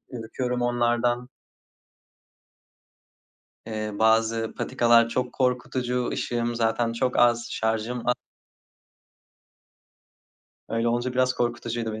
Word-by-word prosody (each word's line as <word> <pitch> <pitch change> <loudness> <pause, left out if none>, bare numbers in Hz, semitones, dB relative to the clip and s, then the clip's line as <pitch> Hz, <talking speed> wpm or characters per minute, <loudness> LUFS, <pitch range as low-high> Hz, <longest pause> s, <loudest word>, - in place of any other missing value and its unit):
ürküyorum 125 +1 -3
onlardan. 120 0 +1 2.4
Eee, 110 -1 -4
bazı 115 0 +2
patikalar 115 -1 +3
çok 125 +1 -2
korkutucu, 125 -1 -1
ışığım 120 0 -1
zaten 115 0 +1
çok 125 +2 -1
az, 120 0 +3
şarjım 110 +2 -1
a 125 - +4 2.5
Öyle, 115 +1 0
olunca 120 +2 -1
biraz 130 0 +2
korkutucuydu 120 -2 -2
be 110 - -6
120 Hz, 90 wpm, -25 LUFS, 115-125 Hz, 2.5 s, a